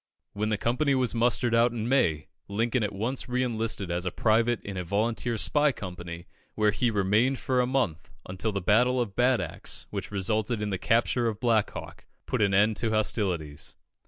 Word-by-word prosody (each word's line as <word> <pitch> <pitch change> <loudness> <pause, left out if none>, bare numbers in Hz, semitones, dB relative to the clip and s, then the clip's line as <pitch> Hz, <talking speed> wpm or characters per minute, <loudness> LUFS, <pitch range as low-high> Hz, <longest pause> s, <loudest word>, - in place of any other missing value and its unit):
When 105 +1 -1
the 105 - 0
company 130 +6 +1
was 130 -2 +1
mustered 120 0 +2
out 115 +1 +4
in 115 -1 -3
May, 85 - +2 0.2
Lincoln 115 +4 0
at 105 -1 -1
once 125 +6 -2
re 125 +1 +1
enlisted 110 -6 -2
as 85 +1 -1
a 90 - -1
private 115 +3 +2
in 100 - -6
a 90 - -3
volunteer 110 +5 -1
spy 150 +5 +3
company, 90 -5 -8 0.3
where 105 -1 +3
he 120 +3 +1
remained 105 +6 +2
for 125 +1 +1
a 125 - 0
month, 125 -12 -1 0.2
until 95 +4 -2
the 100 -1 -3
Battle 125 +7 +3
of 110 -5 -2
Bad 125 0 +3
Axe, - - -5
which - - -4
resulted 105 +3 -1
in 105 -1 -2
the 95 - -2
capture 120 +1 +1
of 110 -2 -3
Black 115 -4 +2
Hawk, - - -9 0.2
put - - -1
an 100 -1 +3
end 105 +2 +3
to 115 - 0
hostilities. 90 -8 -1
110 Hz, 195 wpm, -27 LUFS, 100-120 Hz, 0.3 s, out